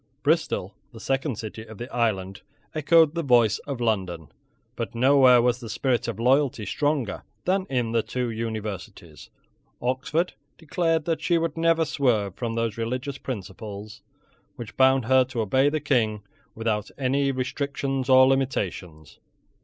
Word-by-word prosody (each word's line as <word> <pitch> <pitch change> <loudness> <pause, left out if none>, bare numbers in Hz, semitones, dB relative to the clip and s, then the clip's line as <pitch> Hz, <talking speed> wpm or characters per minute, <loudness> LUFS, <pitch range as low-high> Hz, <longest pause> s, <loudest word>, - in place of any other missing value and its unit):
Bristol, - - 0 0.2
the - - -12
second 135 -2 -1
city 110 0 -7
of 110 -1 -12
the 120 - -6
island, 100 -4 -1 0.3
echoed 160 0 +4
the 170 - -1
voice 120 -7 +3
of 140 -4 -4
London. 95 - -2 0.5
But - - -5
nowhere 130 -1 +6
was 125 0 +1
the 115 -3 -8
spirit 120 +2 0
of 115 -4 -3
loyalty 130 -2 +2
stronger 145 -5 -1 0.2
than 190 +1 +1
in 125 -4 -1
the 115 0 +2
two 125 +1 -3
Universities. 110 -3 -6 0.5
Oxford 130 +8 -1 0.2
declared 165 -1 0
that 165 -2 -1
she 175 - +2
would 165 -2 -1
never 165 0 +2
swerve 120 - 0
from 115 +2 -4
those 115 -2 -1
religious 125 +4 -3
principles 105 -1 -7 0.5
which 115 -2 -9
bound 130 -2 +4
her 130 +2 +5
to 125 -2 -3
obey 130 +7 +3
the 155 +1 -1
King 110 -8 0 0.3
without 110 -2 -2
any 140 +1 +1
restrictions 135 0 -3
or 130 0 +8
limitations. 95 - -2
125 Hz, 145 wpm, -25 LUFS, 110-140 Hz, 0.5 s, or